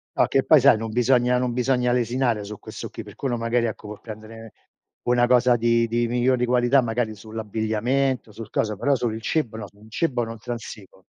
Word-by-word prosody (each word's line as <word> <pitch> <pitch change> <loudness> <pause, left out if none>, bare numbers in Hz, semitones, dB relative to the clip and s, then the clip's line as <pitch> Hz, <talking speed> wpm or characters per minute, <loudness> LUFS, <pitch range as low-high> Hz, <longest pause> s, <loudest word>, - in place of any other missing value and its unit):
No, - - +4
che 135 - +2
poi 155 - +6
sai 135 -1 +6
non 115 0 -4
bisogna 125 +1 +2
non 125 -1 -1
bisogna 125 0 +1
lesinare 120 -2 0
su 105 0 -8
questo - - -8
qui, - - -8
per - - -13
quello 125 -4 -2
magari 115 +1 0
ecco 105 -1 -7
vuol 105 0 -9
prendere 110 0 -10 0.5
una 120 0 +3
cosa 125 0 +4
di 115 0 +2
di 120 +1 0
migliori 125 +1 +2
qualità 125 +2 +3
magari 115 -2 -2
sull'abbigliamento, 110 +4 -2
sul 110 0 -9
coso, 110 -1 -1
però 140 +7 +1
sul 120 -3 -1
il 110 - -6
cibo 120 -4 -1
no, 105 -2 -6
su 100 - -24
un 110 +1 -17
cibo 125 -1 0
non 115 0 -7
transigo. 110 -3 -8
120 Hz, 205 wpm, -23 LUFS, 110-125 Hz, 0.5 s, poi